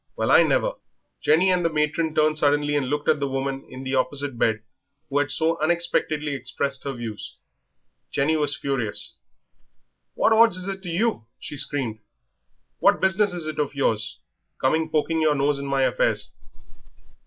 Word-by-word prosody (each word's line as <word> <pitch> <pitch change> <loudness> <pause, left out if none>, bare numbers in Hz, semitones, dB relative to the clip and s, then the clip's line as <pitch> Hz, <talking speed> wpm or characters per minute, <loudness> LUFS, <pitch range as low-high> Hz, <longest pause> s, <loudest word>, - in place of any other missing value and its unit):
Well - - 0
I - - +8
never!" - - +2 0.5
Jenny 175 +5 +4
and 180 -1 +1
the 165 - +2
matron 155 +1 0
turned 155 0 +3
suddenly 145 -1 +2
and 140 -3 0
looked 150 +1 -2
at - - +3
the 140 - -1
woman 135 0 -3
in 130 +1 -9
the 130 0 -4
opposite 135 +1 0
bed 110 -2 0 0.5
who 145 - +2
had 145 0 0
so 160 +4 +1
unexpectedly 155 -3 0
expressed 135 +1 -3
her 140 - -2
views. 115 -4 -7 0.7
Jenny 150 +3 +1
was 150 -2 0
furious. 130 -7 -3 1.0
"What 225 - +3
odds 225 -4 +5
is 185 +1 -5
it 195 -1 -4
to 180 - -7
you?" 175 - -1
she - - -8
screamed; 130 -6 -1 0.8
"what - - +4
business 195 +2 +2
is 175 -3 -4
it 155 -1 -5
of 145 -1 -1
yours, 110 -6 0 0.4
coming 160 +4 +1
poking 160 +1 0
your 155 -1 +3
nose 140 0 +1
in 140 - -5
my 135 -1 +1
affairs?" - - +1
145 Hz, 170 wpm, -24 LUFS, 135-160 Hz, 1.0 s, I